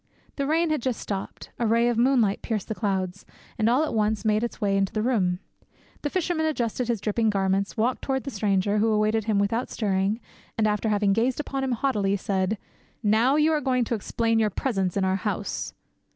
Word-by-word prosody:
The 280 -1 -1
rain 325 +2 +2
had 305 - 0
just 250 -1 -1
stopped, 195 -2 -6
a 235 - +1
ray 230 +2 +3
of 240 - +1
moonlight 235 -4 +3
pierced 215 -4 -3
the - - 0
clouds, 190 -3 -2 0.4
and 220 +1 +3
all 255 +6 +3
at 315 - -2
once 215 0 0
made 215 +1 +2
its 235 - -4
way 200 -3 +1
into 195 -1 +1
the 215 - -1
room. 195 -8 +1 0.6
The 290 - -1
fisherman 335 -2 0
adjusted 245 -4 -1
his 235 -3 0
dripping 220 +2 +1
garments, 195 0 0
walked 240 +3 +1
towards 265 -1 -2
the 275 - -4
stranger, 205 -1 +1
who 220 - +3
awaited 215 0 +2
him 215 -2 +1
without 215 +5 0
stirring, 200 0 0 0.4
and 220 - +2
after 210 +1 0
having 205 -1 +2
gazed 235 +5 +1
upon 275 -2 -3
him 260 -2 0
haughtily, 210 -6 +1
said, 190 +2 -1 0.5
"Now 225 +6 +4
you 305 +1 +4
are 300 - +1
going 255 -3 +1
to 235 - -2
explain 225 +1 0
your 215 -1 +3
presence 195 -4 -1
in 195 - +2
our 190 0 +1
house." 205 +1 -3
220 Hz, 210 wpm, -25 LUFS, 200-250 Hz, 0.6 s, Now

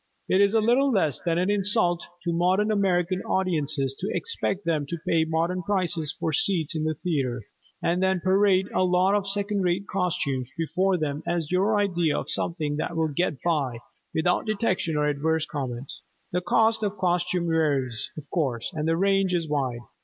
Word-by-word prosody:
It 190 - +3
is 200 +2 +3
little 240 +5 +3
less 170 - +1
than 170 -1 -1
an 185 +3 +1
insult 195 -4 +1 0.2
to 170 - -1
modern 185 +5 +2
American 185 -2 +1
audiences 150 -7 0
to 195 - -3
expect 205 - -2
them 155 -4 0
to 170 - -4
pay 160 -1 +3
modern 165 +3 -1
prices 175 -5 0
for 160 - -1
seats 165 0 +1
in 155 0 -1
the 155 0 0
theatre 135 -9 -2 0.4
and 175 +2 +1
then 190 -1 +2
parade 190 +1 +3
a - - +2
lot 185 +2 +3
of 205 -1 0
second 200 0 0
rate 180 +2 0
costumes 170 -10 -1
before 180 +3 +1
them 150 -2 -2
as 170 -2 -1
your 200 +4 +2
idea 175 -6 +1
of - - -4
something 155 -4 -2
that 165 +2 -3
will 160 -1 +1
"get 150 -1 -2
by" 145 -8 0 0.3
without 175 +7 0
detection 195 -7 0
or 150 - +2
adverse 155 +2 0
comment. 135 -3 -5 0.4
The 180 - 0
cost 220 +5 +2
of 210 -1 -2
costumes 180 -1 0
varies, 140 -7 0
of 150 -2 -8
course, 135 -3 -1
and 155 -1 -2
the 165 0 +2
range 195 -1 +2
is 165 -2 -1
wide. 130 -5 -1
175 Hz, 180 wpm, -25 LUFS, 155-190 Hz, 0.4 s, It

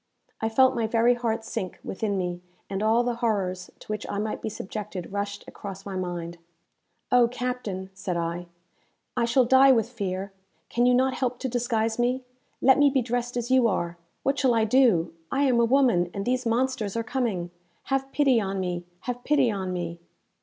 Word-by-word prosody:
I 220 - +1
felt 260 +3 +5
my 230 -2 0
very 230 +2 +4
heart 230 -2 -2
sink 185 -4 -4
within 200 0 -2
me, 180 -1 -3 0.3
and 195 0 -2
all 225 +3 +3
the 240 -1 -1
horrors 195 -6 -1
to - - -16
which 215 -1 -3
I - - -2
might 215 +1 -2
be - - -3
subjected 200 -3 -6
rushed 200 0 -4
across 195 -1 -8
my 195 -1 -5
mind. 175 -2 -4 0.7
"Oh, 245 -2 +6
captain," 235 -6 -4
said 190 -2 -3
I, 170 +1 -3 0.7
"I 235 - +2
shall 245 +2 +3
die 265 +2 +7
with 230 -3 +3
fear! 195 -4 -3 0.4
Can 240 +1 +2
you 250 - +5
not 260 +1 +3
help 250 -1 -1
to 265 - -1
disguise 230 -2 0
me? 250 +2 +1 0.4
let 265 +2 +6
me 290 0 +6
be 265 -2 +1
dressed 245 +1 -2
as 240 +1 -2
you 260 -2 +5
are! 175 -4 -1 0.3
What 275 +1 +1
shall 255 -4 +3
I 225 -1 +3
do? 220 -9 +3 0.2
I 275 +1 +2
am 255 -4 +3
a 235 - +5
woman, 235 -9 +3
and 200 0 -3
these 250 0 0
monsters 230 -3 0
are 230 - 0
coming! 220 -8 -2 0.3
Have 270 0 -1
pity 270 -6 +3
on 195 -1 -2
me! 175 -1 -3 0.2
Have 245 0 -4
pity 280 -5 +3
on 190 -2 -3
me!" 170 -1 -4
225 Hz, 195 wpm, -26 LUFS, 190-250 Hz, 0.7 s, die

